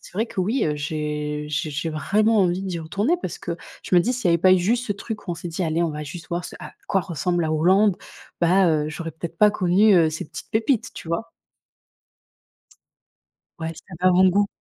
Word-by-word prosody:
c'est -, -, -15 dB
vrai 220 Hz, +4 st, +1 dB
qu'oui, 220 Hz, +5 st, -1 dB
j'ai 150 Hz, 0 st, -3 dB
j'ai 150 Hz, +1 st, -2 dB
j'ai 155 Hz, +3 st, -3 dB
vraiment 210 Hz, +8 st, +2 dB
envie 185 Hz, -1 st, +2 dB
d'y 185 Hz, -3 st, -3 dB
retourner 200 Hz, -, 0 dB
parce 175 Hz, -, -5 dB
que 170 Hz, -, -4 dB, 0.3 s
je -, -, -1 dB
me 175 Hz, -, +7 dB
dis: 245 Hz, +9 st, 0 dB
«S'il 250 Hz, -5 st, -2 dB
y -, -, +4 dB
avait 170 Hz, 0 st, +4 dB
pas 185 Hz, +2 st, +5 dB
eu -, -, +3 dB
juste 235 Hz, +7 st, 0 dB
ce 205 Hz, -, 0 dB
truc 210 Hz, 0 st, -7 dB
où -, -, 0 dB
on -, -, -3 dB
s'est 170 Hz, +1 st, -7 dB
dit: 170 Hz, +3 st, -3 dB
"Allez, 165 Hz, +1 st, 0 dB
on 170 Hz, -, 0 dB
va 150 Hz, 0 st, -5 dB
juste 165 Hz, +4 st, -9 dB
voir 175 Hz, +1 st, -2 dB
ce -, -, -10 dB
à -, -, -9 dB, 0.2 s
quoi 195 Hz, -, +2 dB
ressemble 175 Hz, 0 st, -1 dB
la 155 Hz, -, 0 dB
Hollande", 185 Hz, +5 st, +3 dB, 0.4 s
bah, 180 Hz, +2 st, +4 dB
heu, 150 Hz, -1 st, +1 dB
j'aurais 165 Hz, +2 st, -5 dB
peut-être 160 Hz, +2 st, -7 dB
pas 210 Hz, 0 st, +6 dB
connu, 195 Hz, +2 st, +4 dB
heu, 165 Hz, -3 st, +5 dB
ces 155 Hz, -, -5 dB
petites -, -, -10 dB
pépites» 230 Hz, +2 st, +1 dB
tu -, -, -9 dB
vois? 220 Hz, +8 st, -3 dB, 2.3 s
Ouais, 165 Hz, 0 st, -4 dB
cet 175 Hz, 0 st, -12 dB
avant-goût. 185 Hz, +2 st, +4 dB
175 Hz, 220 wpm, -23 LUFS, 160-200 Hz, 2.3 s, me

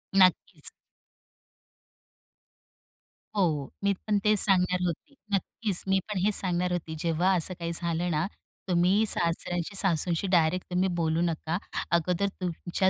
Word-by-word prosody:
नक्कीच. 185 Hz, -2 st, +3 dB, 2.7 s
हो, 200 Hz, -, +2 dB
हो. 150 Hz, -5 st, -1 dB
मी 200 Hz, 0 st, +3 dB
पण 210 Hz, -1 st, +2 dB
तेच 210 Hz, -1 st, +4 dB
सांगणार 180 Hz, -2 st, +4 dB
होती. 175 Hz, -, -5 dB, 0.2 s
नक्कीच 195 Hz, 0 st, -1 dB
मी 190 Hz, 0 st, +3 dB
पण 205 Hz, -, -3 dB
हेच 210 Hz, -1 st, +3 dB
सांगणार 180 Hz, -1 st, -1 dB
होती, 160 Hz, -2 st, -3 dB
जेव्हा 170 Hz, +3 st, +1 dB
असं 180 Hz, +2 st, +2 dB
काही 170 Hz, 0 st, -3 dB
झालं 170 Hz, +1 st, -1 dB
ना, 155 Hz, 0 st, 0 dB, 0.4 s
तुम्ही 180 Hz, +5 st, +3 dB
सासऱ्यांशी-सासूंशी 175 Hz, 0 st, 0 dB
डायरेक्ट 175 Hz, +1 st, +2 dB
तुम्ही 185 Hz, +2 st, +1 dB
बोलू 165 Hz, 0 st, 0 dB
नका. 165 Hz, 0 st, -1 dB, 0.3 s
अगोदर 175 Hz, +3 st, +1 dB
तुमच्या 180 Hz, +2 st, -1 dB
180 Hz, 125 wpm, -27 LUFS, 170-190 Hz, 2.7 s, तेच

